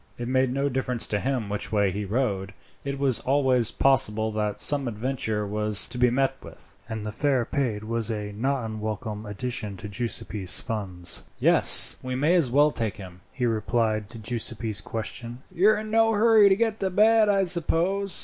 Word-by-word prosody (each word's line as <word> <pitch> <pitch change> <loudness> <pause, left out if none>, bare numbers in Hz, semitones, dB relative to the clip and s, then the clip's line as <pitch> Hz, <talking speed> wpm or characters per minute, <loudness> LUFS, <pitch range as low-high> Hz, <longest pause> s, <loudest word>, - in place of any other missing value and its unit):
It 120 - -5
made 130 0 +1
no 140 +2 -1
difference 125 -3 -1
to 105 - -2
him 130 -2 -2
which 105 0 -5
way 100 -3 +1
he 100 +2 -4
rowed. 100 -3 -2 0.3
It 140 0 -4
was 135 -4 +2
always 130 -4 +1
possible 110 -5 +2
that 105 -1 -3
some 140 -3 +1
adventure 110 -2 -3
was 105 0 +3
to 125 0 -6
be 125 0 +4
met 135 +2 0
with, - - -14
and 110 -1 -5
the 105 - -4
fare 130 +1 0
paid 115 -6 -3
was 115 0 -2
a 105 -2 -4
not 130 +4 -2
unwelcome 110 0 -6
addition 105 -1 -4
to 105 - -8
Giuseppi's 105 -3 -1
funds. 95 -7 -4 0.2
"Yes, - - +6
we 130 0 -5
may 150 +6 +1
as 165 -8 +2
well 145 +4 +3
take 110 -6 -4
him," 90 -2 -12
he 125 - -3
replied 110 -1 -1
to 115 - -9
Giuseppi's 115 -1 -2
question. 115 +3 -6
"You 195 +5 +3
are 215 - +3
in 215 0 -6
no 225 0 +3
hurry 215 -1 +5
to 190 - +4
get 225 +1 -1
to 190 - -1
bed, 215 +3 +3
I 195 -1 +2
suppose?" 180 +2 +1
120 Hz, 190 wpm, -25 LUFS, 105-140 Hz, 0.3 s, Yes